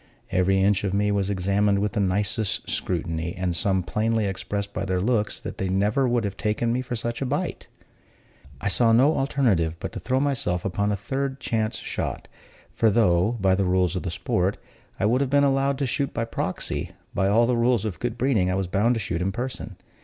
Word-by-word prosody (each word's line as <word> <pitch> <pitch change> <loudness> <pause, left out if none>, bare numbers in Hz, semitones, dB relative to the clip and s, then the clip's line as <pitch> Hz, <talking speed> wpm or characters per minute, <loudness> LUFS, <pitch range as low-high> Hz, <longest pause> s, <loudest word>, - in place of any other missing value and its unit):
Every 95 +1 +2
inch 95 0 +2
of 100 -1 -1
me 105 0 +2
was 100 -1 0
examined 100 +1 +1
with 105 0 0
the 105 - -2
nicest 100 +2 0
scrutiny; 85 -1 -2
and 90 -2 -1
some 95 0 +1
plainly 110 +3 0
expressed 100 +1 -3
by 95 - -2
their 95 -2 0
looks 105 +1 0
that - - -7
they 95 - -1
never 105 +8 +2
would 120 -1 +1
have 100 -1 -3
taken 115 +2 0
me 125 - 0
for 125 -1 -4
such 115 +1 -3
a - - 0
bite. 150 +7 -3 0.9
I 105 - -3
saw 115 +2 +4
no 135 +7 +5
alternative 110 - +1
but - - -5
to - - -6
throw 130 +2 0
myself 130 -11 -1
upon 100 +2 0
a - - +1
third 135 +6 -3
chance 110 -3 -1
shot; - - -4 0.5
for 115 - +3
though, 100 -1 +3
by 95 -1 +3
the 95 0 +1
rules 90 0 +2
of 90 - -1
the 95 - -3
sport, 90 +3 -1 0.4
I - - +1
would 120 +5 +3
have 140 - 0
been 140 +1 +4
allowed 135 0 +2
to 140 - 0
shoot 140 +2 -2
by 115 - 0
proxy, 115 - -3 0.2
by 95 - +1
all 110 +4 +4
the 125 +1 +1
rules 120 -2 +2
of 105 -5 -4
good 120 -1 -3
breeding 115 -8 +2
I 90 - 0
was 95 0 0
bound 105 +7 +2
to - - -1
shoot 90 -4 -3
in 95 +2 0
person. 120 -2 -5
105 Hz, 215 wpm, -25 LUFS, 95-120 Hz, 0.9 s, no